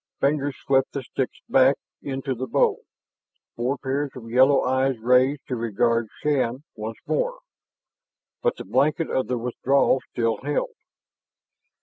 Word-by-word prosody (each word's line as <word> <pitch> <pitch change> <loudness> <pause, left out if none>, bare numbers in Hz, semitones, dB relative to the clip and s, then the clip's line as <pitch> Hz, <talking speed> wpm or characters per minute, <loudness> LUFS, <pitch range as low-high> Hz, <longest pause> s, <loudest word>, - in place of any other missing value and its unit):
Fingers 140 -1 +1
swept 135 -1 +1
the 140 - -3
sticks 130 +1 -4
back 135 +1 +5 0.3
into 135 0 -3
the 130 +1 -4
bowl; - - +2 0.7
four 125 +4 -1
pairs 140 +2 -2
of 115 -3 -9
yellow 130 +3 +5
eyes 130 0 +1
raised 125 +5 +3
to 130 - -2
regard 115 0 +1 0.2
Shann 135 -3 0
once 110 +1 -6
more, - - -1 1.0
but 485 -1 +1
the - - -7
blanket 150 +5 +1
of 130 -4 0
their 125 +1 -1
withdrawal 130 +3 +2
still 115 -2 0
held. 145 +1 -1
130 Hz, 135 wpm, -24 LUFS, 120-140 Hz, 1.0 s, back